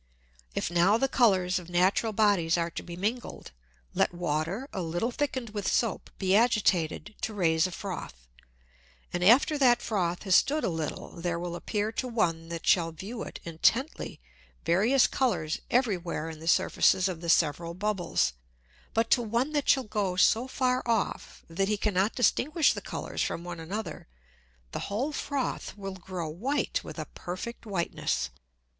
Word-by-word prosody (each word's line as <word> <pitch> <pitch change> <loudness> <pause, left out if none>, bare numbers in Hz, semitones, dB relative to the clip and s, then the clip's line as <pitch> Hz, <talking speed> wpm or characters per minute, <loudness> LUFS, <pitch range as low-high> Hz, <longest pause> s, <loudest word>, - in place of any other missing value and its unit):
If - - -1
now 175 +5 +4
the 270 - +2
Colours 190 -9 +3
of 175 -1 -12
natural 185 +5 +2
Bodies 200 -6 +3
are 170 0 -1
to - - -5
be 175 - -8
mingled, 215 - -4 0.4
let - - +2
Water 175 - -2
a 190 - -2
little 175 +8 -1
thicken'd 260 -4 -2
with 205 -2 -2
Soap 230 -4 0
be 190 0 +2
agitated 210 -5 +2
to 220 - -3
raise 165 -3 +3
a - - -8
Froth, 175 - -7 0.9
and 175 0 -1
after 275 - +5
that 245 -3 +5
Froth 180 -5 -1
has 190 -3 +1
stood 300 +2 +3
a - - +1
little, 160 -3 -4
there 175 0 -1
will 175 0 -4
appear 210 +4 -2
to 255 +3 -3
one 165 -9 0
that 170 -1 -5
shall 170 -4 +3
view 205 +9 -7
it - - -7
intently 220 - 0 0.5
various 225 +10 +4
Colours 175 -12 0
every 240 -6 +2
where 170 -2 -4
in 160 - -10
the 165 - -9
Surfaces 185 +2 +3
of 175 -3 -4
the 170 - -4
several 170 +1 +2
Bubbles; 190 - 0 0.6
but 225 +1 +1
to 245 - +5
one 235 +5 0
that 290 -2 0
shall 265 - +5
go 205 -4 -1
so 225 +6 +4
far 255 -1 +1
off, 225 -3 -1
that 195 +4 -1
he 210 0 +1
cannot 200 0 +1
distinguish 295 +6 +3
the - - -6
Colours - - -5
from 170 - -2
one 175 -1 -6
another, 200 +7 -5 0.6
the - - -4
whole 240 +9 -1
Froth 275 -6 -3
will 195 -1 -5
grow 180 -2 -5
white 265 - -1
with - - -9
a - - -4
perfect 220 +7 -6
Whiteness. 120 - -1
195 Hz, 170 wpm, -28 LUFS, 170-235 Hz, 0.9 s, after